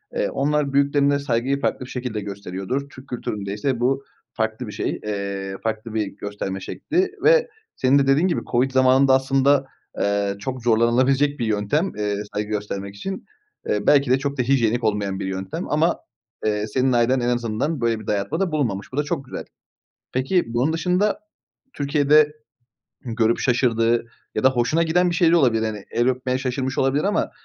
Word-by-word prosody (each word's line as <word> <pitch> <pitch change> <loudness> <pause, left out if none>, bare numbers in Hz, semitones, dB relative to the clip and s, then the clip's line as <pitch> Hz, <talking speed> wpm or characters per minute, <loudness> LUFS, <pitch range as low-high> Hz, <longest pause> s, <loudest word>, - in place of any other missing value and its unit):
Eee, - - 0
onlar 145 - 0
büyüklerine 140 0 +3
saygıyı 135 +1 -1
farklı 130 - -1
bir - - -13
şekilde 125 -4 -4
gösteriyordur. 100 +7 -4
Türk 130 -1 -14
kültüründe 105 -5 -4
ise 125 +4 -1
bu 135 +3 +1 0.3
farklı 110 +1 -2
bir - - -6
şey, 105 - -3
eee, 100 -2 -4
farklı 110 0 -3
bir 110 -1 0
gösterme 100 -2 -5
şekli. 360 - -1
Ve 480 +1 +5 0.3
senin 135 +2 +3
de 135 - +1
dediğin 145 +7 +4
gibi 170 - 0
COVID 130 +3 +2
zamanında 130 +1 +5
aslında, 135 +1 +3 0.3
eee, 100 -1 0
çok 125 +4 -5
zorlanılabilecek 130 +5 +3
bir 120 - 0
yöntem, 110 - 0
eee, 105 -1 -1 0.2
saygı 105 0 -2
göstermek 100 -1 -4
için. 190 - -6 0.4
Eee, 105 - -1
belki 140 -3 +5
de 130 - +4
çok 140 +1 -3
da - - +2
hijyenik 120 -2 +2
olmayan 100 -3 0
bir - - -3
yöntem 95 - -4
ama, 160 +3 +2 0.5
eee, 105 0 0
senin 130 +4 +1
ailen 120 +2 +3
en 120 0 0
azından 120 +5 -1
böyle 115 -1 +1
bir 110 - -12
dayatmada 160 - -1
bulunmamış. 115 -10 -2
Bu - - -5
da 145 - +2
çok 145 -2 -3
güzel. - - -7 0.7
Peki, 135 +8 +1
bunun 130 +7 +1
dışında 180 +5 +1 0.5
Türkiye'de 145 +1 +3 0.7
görüp 115 -3 0
şaşırdığı 120 -2 +2 0.3
ya 110 - -1
da 130 - +7
hoşuna 130 +6 +1
giden 175 +2 +2
bir 170 - -1
şeyler 165 0 +4
olabilir. 120 -9 +3
Hani 105 -2 -5
el 120 +1 +1
öpmeye 130 0 -1
şaşırmış 130 0 -2
olabilir 135 +2 +2
ama 205 +1 0
130 Hz, 175 wpm, -22 LUFS, 110-140 Hz, 0.7 s, da